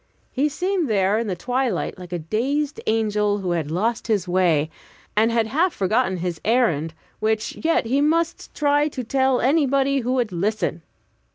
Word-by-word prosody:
He 285 +3 +1
seemed 360 0 -1
there 200 0 +2
in 230 - -2
the 190 - -2
twilight 245 -1 -2
like 180 -1 -10
a 175 - -1
dazed 265 - -2
angel 210 -2 +1
who 185 -3 -3
had 165 -4 -1
lost 220 +9 -1
his 205 -5 0
way, 170 -4 +2 0.4
and 220 +2 +3
had 230 -1 +2
half 320 +11 +1
forgotten 190 -1 +1
his 175 -1 -4
errand, 170 - +1 0.2
which 220 0 -1
yet 325 -6 +2
he 265 +5 +1
must 330 +3 0
try 290 0 +2
to 265 -4 -5
tell 265 +1 +2
to - - 0
anybody 275 -1 +2
who 250 0 -1
would 245 -5 0
listen. 185 -1 -1
225 Hz, 175 wpm, -22 LUFS, 185-275 Hz, 0.4 s, and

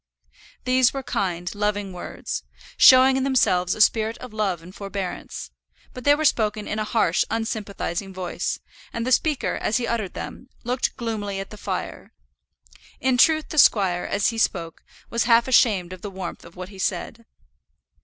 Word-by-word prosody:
These 255 -1 +4
were 270 - -3
kind, 180 -6 -2
loving 205 -2 -2
words, 180 - -5 0.3
showing 260 0 +7
in 265 - 0
themselves 185 -9 +2
a 215 - -2
spirit 220 +1 +3
of 250 -3 -10
love 195 -6 -1
and 180 +2 -12
forbearance; 195 -2 -6 0.4
but 250 - -9
they 290 0 +6
were 310 +1 -2
spoken 215 -5 +1
in 210 - -2
a - - 0
harsh, 210 -6 +2
unsympathizing 205 -4 -3
voice, 185 -2 -3 0.3
and 230 0 -3
the 255 - -1
speaker, 300 +2 +1
as 215 - +1
he 245 - -1
uttered 230 -5 -3
them, 255 - -8
looked 245 +1 -1
gloomily 210 -5 -3
at 195 - -7
the - - -8
fire. - - -5 0.9
In 260 -1 +2
truth 310 +4 +4
the 310 - +1
squire, 190 -8 +4
as 200 0 +1
he 230 -1 -4
spoke, 170 -6 -1 0.3
was 235 - +1
half 235 0 +4
ashamed 200 -8 +3
of 185 - -11
the 205 - -5
warmth 190 -2 -7
of 170 - -14
what 185 0 -7
he 195 -2 -13
said. 230 +4 -3
215 Hz, 175 wpm, -23 LUFS, 190-245 Hz, 0.9 s, showing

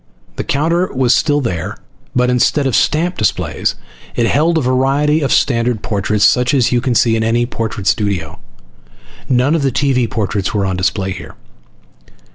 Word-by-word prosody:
The - - -2
counter 170 +6 0
was 125 -2 +2
still 145 -2 +1
there, 90 - -4 0.4
but 125 0 +2
instead 130 +3 +2
of 130 - 0
stamp 170 +4 +1
displays 110 - -1 0.4
it 120 - +1
held 160 +7 +2
a - - +1
variety 135 +4 +1
of 140 - -1
standard 115 -3 +1
portraits 105 0 0
such 125 +5 +3
as 125 -4 +2
you 120 -1 +1
can 125 -1 -1
see 115 -4 +3
in 110 - 0
any 120 +2 +1
portrait 110 -4 -5
studio. 95 - -1 0.9
None 130 +3 +2
of 165 - +1
the 135 -1 +1
TV 125 -2 +1
portraits 105 -2 -2
were 100 -2 0
on 95 -1 -1
display 95 +1 -1
here. 90 -2 -9
125 Hz, 170 wpm, -16 LUFS, 105-140 Hz, 0.9 s, such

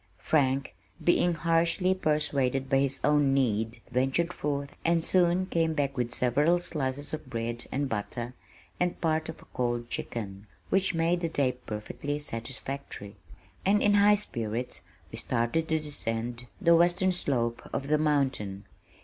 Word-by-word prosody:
Frank 135 -1 +1 0.3
being 175 0 +3
harshly 170 +3 +2
persuaded 140 -6 0
by 135 - +5
his 135 0 +2
own 145 -2 +3
need, 115 -3 +1
ventured 135 +7 +1
forth 140 -1 -3
and 170 0 +2
soon 180 0 +3
came 165 -3 0
back 140 -2 0
with 125 -3 -1
several 145 +9 +3
slices 145 -5 -3
of 155 -4 -5
bread 120 -1 -3
and 140 +2 0
butter 120 +2 -3 0.5
and 180 0 0
part 160 -1 0
of 160 - -7
a - - -22
cold 120 -1 -2
chicken, 100 -3 -5 0.2
which 190 -2 +2
made 165 +2 +2
the 165 - 0
day 140 -5 +2
perfectly 125 +4 -5
satisfactory, 130 -4 -5 0.5
and 205 +2 +3
in 205 - +4
high 205 +1 +6
spirits 120 - -2 0.3
we - - -2
started 120 +7 0
to 160 - +2
descend 120 -5 -3
the 170 -4 +5
western 175 +2 +3
slope 120 -9 0
of 135 - -3
the 150 +1 +2
mountain. 135 -10 0
140 Hz, 150 wpm, -28 LUFS, 120-165 Hz, 0.5 s, high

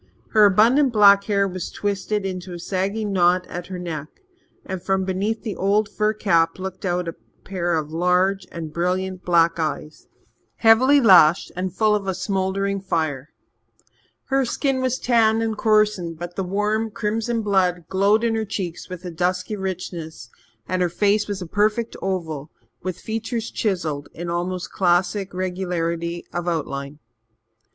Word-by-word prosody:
Her 215 -2 +7
abundant 240 +8 +4
black 200 -2 +6
hair 200 -2 +2
was 185 -2 -5
twisted 205 0 -2
into 185 -1 -5
a - - -8
sagging 200 +4 -2
knot 180 0 +3
at 175 0 -7
her 185 - -6
neck, 160 -4 -5 0.6
and 190 -1 -5
from 190 +1 0
beneath 200 +4 -2
the 220 -4 -4
old 205 +2 +1
fur 210 +1 0
cap 165 -6 +1
looked 190 +1 -6
out 180 -1 -1
a 165 - -3 0.3
pair 175 -3 -1
of 155 -1 -3
large 180 +3 +1
and 160 -2 -7
brilliant 185 +2 -1
black 170 -1 +3
eyes, 155 -1 -4 0.5
heavily 255 +6 +5
lashed, 180 - +6
and 180 0 -3
full 215 -1 +3
of 205 -2 -1
a 190 - -1
smouldering 195 +1 -1
fire. 155 -6 -2 1.0
Her 270 0 +2
skin 260 +1 -1
was 255 -1 0
tanned 225 -3 +3
and 220 -1 -1
coarsened, 210 -6 +1
but 175 +1 -7
the 195 - -2
warm 210 +4 0
crimson 225 +2 -2
blood 180 -4 +1
glowed 200 +4 +2
in 230 -1 +1
her 220 0 0
cheeks 185 -4 -5
with 180 0 -8
a 175 - -5
dusky 180 +4 -1
richness, 170 - -6 0.4
and 185 0 -1
her 180 - +2
face 205 +4 +1
was 200 -2 -4
a - - -7
perfect 215 +5 0
oval, 160 -6 -3 0.3
with 185 -1 -4
features 225 +2 -4
chiselled 165 -9 -2
in 170 0 -5
almost 180 +1 -3
classic 185 +2 +1
regularity 175 -2 -3
of 175 0 -3
outline. 140 -4 -3
190 Hz, 160 wpm, -22 LUFS, 175-210 Hz, 1.0 s, Her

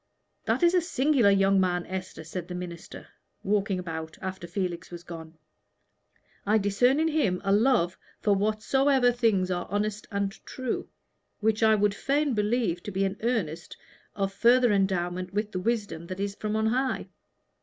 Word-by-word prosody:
"That - - +1
is 345 0 +5
a 360 - +4
singular 275 - +3
young 195 0 +4
man, 180 -1 0
Esther," 185 -3 -6
said 170 +2 -6
the 180 - -6
minister, 175 -2 -8 0.3
walking 200 -1 +1
about 160 -3 -6
after 190 -2 -5
Felix 180 -1 -3
was 175 -1 -9
gone. 160 -2 -9 1.1
"I 210 +2 +3
discern 220 +7 +2
in 320 - +2
him 270 -13 +1
a 195 - +1
love 205 -4 +3 0.2
for 205 - +2
whatsoever 245 +6 +2
things 220 -7 +1
are 175 -1 -2
honest 205 +2 -2
and 200 -1 -1
true, 255 -3 -4 0.5
which 220 +1 +1
I 220 -1 +5
would 205 -1 +2
fain 280 +6 0
believe 210 -4 0
to 205 - -6
be 195 +1 0
an 195 +1 -2
earnest 200 -9 -2 0.4
of 195 -1 -1
further 240 +2 +4
endowment 185 -1 -1
with 210 0 -1
the 185 - -3
wisdom 200 -6 -2
that 185 +1 -6
is 200 0 -2
from 210 +1 -3
on 220 0 +1
high. 255 +4 0
200 Hz, 165 wpm, -27 LUFS, 180-230 Hz, 1.1 s, is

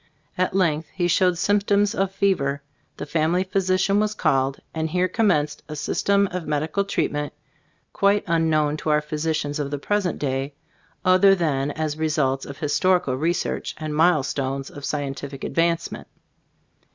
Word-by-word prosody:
At 185 +1 0
length 160 -5 +1
he 175 -2 +1
showed 180 +1 +3
symp 205 +3 +1
toms 205 +1 +3
of 195 -2 0
fever; 145 -9 0 0.3
the - - -5
family 165 +3 +1
physician 190 +1 +1
was 215 0 0
called, 135 -4 +1
and 160 0 -2
here 180 +3 +1
commenced 155 -8 +1
a 155 - -5
system 200 +6 +1
of 180 -3 -4
medical 155 +6 0
treatment 150 -6 -2 0.6
quite 200 +1 +2
un 165 -1 +2
known 155 -1 +1
to 155 - -4
our 150 0 +3
physicians 150 -1 -2
of 145 -1 -2
the 145 - -3
pres 205 +6 0
ent 175 - -3
day, 135 0 -2 0.5
other 185 +2 +6
than 145 -6 0
as 155 0 -3
results 145 -4 0
of 140 - -8
his 150 -1 -1
torical 180 -8 +2
research 170 +4 -1
and 155 -1 -4
milestones 140 -4 +1
of 145 -1 -8
scientific 140 -1 -4
advancement. 170 0 -1
160 Hz, 160 wpm, -23 LUFS, 145-185 Hz, 0.6 s, other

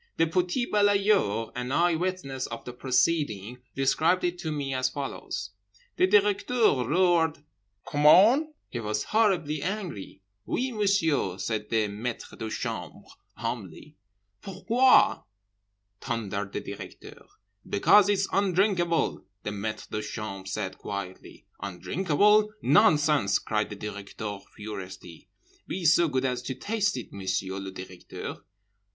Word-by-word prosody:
The 165 - +4
petit 180 +8 0
balayeur, 200 - +2
an 125 +1 -4
eye 175 +4 +3
witness 160 -7 -3
of 115 0 -8
the 125 - -7
proceeding, 125 -4 0 0.2
described 155 +7 +2
it 175 0 -1
to 160 - -3
me 140 -3 -3
as 130 0 +1
follows: 130 -7 -5 0.5
"The 185 - +4
Directeur 205 - +3
roared 165 -3 +2 0.4
'COMMENT?' 195 - +6 0.2
He 120 - -3
was 105 -1 -2
horribly 180 -9 +1
angry. 180 - -5 0.2
'Oui, 260 +1 -1
Monsieur,' 195 - +1
said 105 +2 -3
the 110 -2 +1
maitre 110 +4 -5
de 110 - -5
chambre 110 -6 -5 0.3
humbly—'Pourquoi?' 115 - 0 0.8
thundered 100 -5 -3
the - - -3
Directeur.—'Because 100 - 0
it's 195 -1 +2
undrinkable,' 185 -3 +1 0.2
the 105 - -3
maitre 105 +1 -4
de 105 - -2
chambre 105 -3 -6
said 95 -1 -4
quietly.—'Undrinkable? 145 - 0
Nonsense!' 150 - +4
cried 105 -1 -2
the 105 - -6
Directeur 105 0 -6 0.2
furiously.—'Be 100 - -9
so 165 +2 +5
good 130 -3 -1
as 125 -1 -1
to 130 +1 -5
taste 205 - -1
it, - - -8
Monsieur 95 0 -2
le 95 0 -6
Directeur. 95 -1 -8
135 Hz, 115 wpm, -27 LUFS, -, 0.8 s, COMMENT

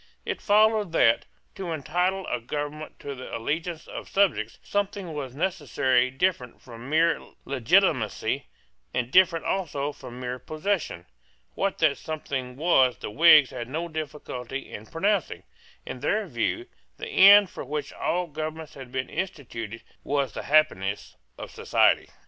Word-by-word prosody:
It - - -3
followed 210 -3 +3
that, 115 -7 +3 0.3
to 185 -3 -5
entitle 180 +5 -1
a 125 - -2
government 145 +4 -5
to 140 - -5
the 130 -1 -6
allegiance 160 +7 -3
of - - -8
subjects, 160 - +1
something 200 -4 -2
was 135 -4 -5
necessary 140 -7 +1
different 130 -3 -1
from 120 +1 -11
mere 165 +2 +3 0.2
legitimacy, 135 - +1 0.5
and 125 0 -1
different 175 -2 +4
also 150 -7 -1
from 125 -3 -10
mere 125 0 -4
possession. 155 - -3 0.5
What 195 - -1
that 155 -3 +2
something 135 -5 -4
was 135 -5 +3
the - - -6
Whigs 155 0 +7
had 120 0 -6
no 165 +5 -3
difficulty 140 -5 -6
in 110 +2 -8
pronouncing. 195 - -1 0.4
In 125 - -6
their 205 - 0
view, 165 - -2 0.3
the 455 - -6
end 200 - +8
for - - -7
which 150 +2 -4
all 180 +1 -1
governments 155 0 -6
had 130 -3 -10
been 130 0 -2
instituted 115 - -5 0.2
was 140 -4 -1
the - - -5
happiness 100 -10 +1 0.2
of - - -8
society. - - +2
150 Hz, 145 wpm, -26 LUFS, 125-180 Hz, 0.5 s, end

